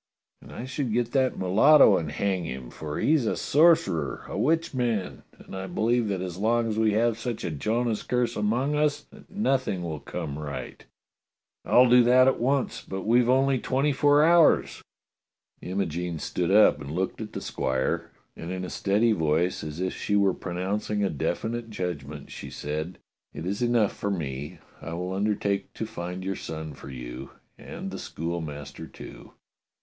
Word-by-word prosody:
" - - -55
"And - - -13
I 120 - -6
should 130 -3 -3
get 120 0 0
that 130 -2 +1
mulatto 105 +6 +6
and 80 -4 -2
hang 95 +2 -1
him, 65 -4 -6
for 75 -1 -6
he's 150 -7 +2
a - - 0
sorcerer, 155 - +3
a - - -6
witchman; 125 - 0 0.2
and - - -11
I 95 0 -5
believe 115 +5 +1
that 95 -3 -2
as 90 -2 -5
long 115 +2 +2
as 110 -1 -1
we 110 -1 +3
have 115 +1 +1
such 120 -1 -4
a - - -2
Jonah's 110 - -1
curse 125 -1 -1
among 120 +7 0
us 150 0 +1
that - - -16
nothing 135 - 0
will 80 -3 -4
come 70 +1 -5
right." 75 -2 -6 0.8
"I'll 125 +1 +6
do 125 +1 +7
that 125 +2 +5
at 135 - +2
once. 125 0 0
But 95 -1 -5
we've 120 +2 +4
only 135 0 +3
twenty 135 +4 +1
four 145 +2 +4
hours." 170 0 +4 0.8
Imogene 90 -2 -3
stood 85 +2 -2
up 105 -3 +5
and 70 - -7
looked 95 +8 -2
at 110 - -7
the - - -3
squire, 65 0 -1 0.3
and 85 - -7
in 95 0 -3
a - - -7
steady 105 +4 +2
voice, 80 -1 +1
as 75 +1 -6
if 95 0 -1
she 105 - -1
were 100 -2 +3
pronouncing 100 +4 -2
a 100 - +1
definite 115 - -3
judg 90 -8 -3
ment, 75 -1 -9
she - - -8
said: 75 +4 -5 0.4
"It - - -6
is 100 +4 -2
enough 120 -4 +2
for 100 - -3
me. 75 -2 -4 0.2
I 85 - -6
will 90 +2 -3
undertake 100 0 -1
to 110 - -3
find 90 -3 -6
your 95 0 -2
son 80 -1 -6
for 70 - -11
you, 60 0 -7 0.3
and - - -7
the - - -6
schoolmaster, 80 -3 -5
too." - - -12
100 Hz, 180 wpm, -26 LUFS, 85-120 Hz, 0.8 s, do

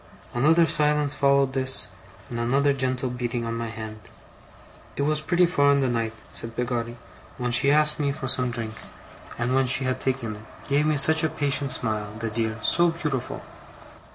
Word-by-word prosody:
Another 160 +7 +4
silence 150 -2 +1
followed 140 -2 +2
this, 130 0 -2 0.4
and 120 - -5
another 140 +4 +2
gentle 130 -1 -1
beating 120 -1 -3
on 115 - -3
my 115 0 -3
hand. 110 -1 -8 1.0
'It 140 - -1
was 155 +1 +1
pretty 175 +3 +3
far 145 -5 +3
in 140 - +2
the 135 - +1
night,' 115 -2 -2 0.2
said 115 0 -6
Peggotty, 120 -1 -3 0.4
'when 125 -1 -2
she 130 +3 +5
asked 150 +1 +4
me 140 -1 +1
for 140 -2 -4
some 125 -1 +3
drink; 115 -2 -4 0.6
and 120 +2 -1
when 135 0 +2
she 130 +2 +3
had 130 0 -1
taken 120 -5 -2
it, - - -13 0.3
gave 145 +2 +2
me 155 -1 +1
such 160 +3 +4
a 160 - +2
patient 140 -2 +1
smile, 110 -4 -2
the 115 -1 -4
dear! 110 0 -2
so 175 0 +4
beautiful! 150 -6 -4
130 Hz, 180 wpm, -25 LUFS, 120-145 Hz, 1.0 s, she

